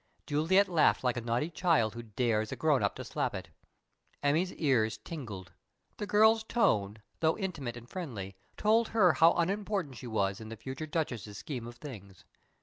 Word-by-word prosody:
Juliet 165 +7 +3
laughed 170 -6 +3
like 125 -1 +1
a 120 - -2
naughty 120 +8 -1
child 160 - +2
who 120 - -6
dares 110 -1 -1
a - - -2
"grown - - +2
up" - - 0
to - - -6
slap - - -2
it. - - -7 0.7
Emmy's 160 +6 +2
ears 120 -8 +1
tingled. 110 - -8 0.5
The 210 - -4
girl's 220 +2 +5
tone, 105 - +1 0.2
though 160 0 +2
intimate 145 - -4
and 120 0 -11
friendly, 115 - -6 0.2
told 220 +2 +3
her 190 -7 +4
how 165 +1 +6
unimportant 190 - -1
she 125 - -8
was 100 -3 -1
in 110 - -8
the 115 - -7
future 130 +7 -6
Duchess's 120 - -3
scheme 125 -3 -5
of 120 - -9
things. 105 -9 -11
135 Hz, 175 wpm, -31 LUFS, 110-175 Hz, 0.7 s, how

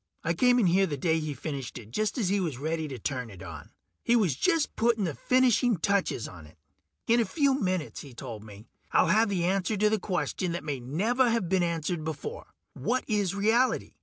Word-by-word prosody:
I 165 - +1
came 245 +7 +4
in 235 - +3
here 190 +2 +3
the 145 - -3
day 160 +3 +1
he 155 -2 -4
finished 135 -2 -5
it, 110 -2 -11
just 215 - -1
as 210 -7 0
he 200 +1 +2
was 160 -9 -2
ready 160 +3 -2
to 135 -3 -6
turn 125 +1 -3
it 95 -3 -11
on. 80 -5 -9 0.3
He 235 - +3
was 190 - +2
just 330 - +1
putting 230 -2 +2
the 165 -5 -1
finishing 250 - +3
touches 190 - 0
on 85 -4 -12
it. 80 - -20 0.5
"In 235 +1 +3
a - - +4
few 280 +3 +1
minutes," 185 -5 -2
he 135 -4 -12
told 115 -5 -7
me, 105 0 -12 0.3
"I'll - - +4
have 220 +1 +4
the 185 -4 0
answer 195 +3 0
to 210 +2 +3
a 215 - +2
question 180 -1 -2
that 170 - -4
may 145 -3 -3
never 215 - +1
have 230 -6 0
been 190 -1 +2
answered 170 -1 -1
before: 300 - -6 0.3
what 255 +1 -1
is 205 -4 0
reality? 225 +5 +2
180 Hz, 220 wpm, -28 LUFS, 145-220 Hz, 0.5 s, came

